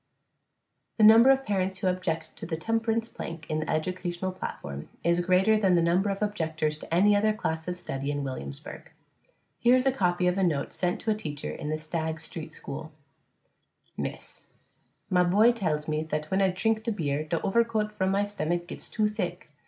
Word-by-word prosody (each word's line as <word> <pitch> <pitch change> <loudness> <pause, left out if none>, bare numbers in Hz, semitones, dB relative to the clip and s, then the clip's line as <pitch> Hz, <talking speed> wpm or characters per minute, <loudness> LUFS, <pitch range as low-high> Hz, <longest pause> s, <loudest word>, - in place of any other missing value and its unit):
The 220 - +3
number 225 +4 +9
of 270 0 +4
parents 190 -2 0
who 185 - -4
object 180 -3 -2
to 165 - -6
the 160 -2 -2
temperance 225 +4 0
plank 165 -6 -7
in 155 - 0
the 155 - -4
educational 180 +2 -2
platform 70 - -6
is 170 +1 +2
greater 190 +4 +4
than 190 -4 +3
the 170 - +4
number 180 +4 +2
of 195 +1 -1
objectors 160 -6 -1
to - - -11
any 200 +5 +5
other 215 +1 +3
class 160 -7 -3
of 180 0 -3
study 135 -5 -4
in 145 -1 -1
Williamsburg. 70 - -7 0.7
Here 245 +1 +5
is 255 +1 +2
a 270 - +4
copy 180 -7 +1
of 180 +2 +2
a - - +2
note 150 -6 0
sent 180 -1 -1
to 220 - 0
a - - +2
teacher 150 -8 -5
in 150 - -5
the 155 - 0
Stagg 160 0 -3
Street 160 0 -7
school: 155 +1 -7 1.0
_Miss - - -3
_: - - -8 0.7
My 180 -1 +5
boy 205 +7 +5
tells 155 -10 -1
me 155 0 0
that 155 -1 -3
when 190 +1 +2
I 190 - +4
trink 220 +4 0
beer 145 -4 -1
der 160 +2 -1
overcoat 215 0 +1
vrom 190 0 +2
my 200 +1 +2
stummack 175 -4 -2
gets 175 - -7
to 215 -2 +1
thick. 185 -6 -4
180 Hz, 195 wpm, -28 LUFS, 160-210 Hz, 1.0 s, number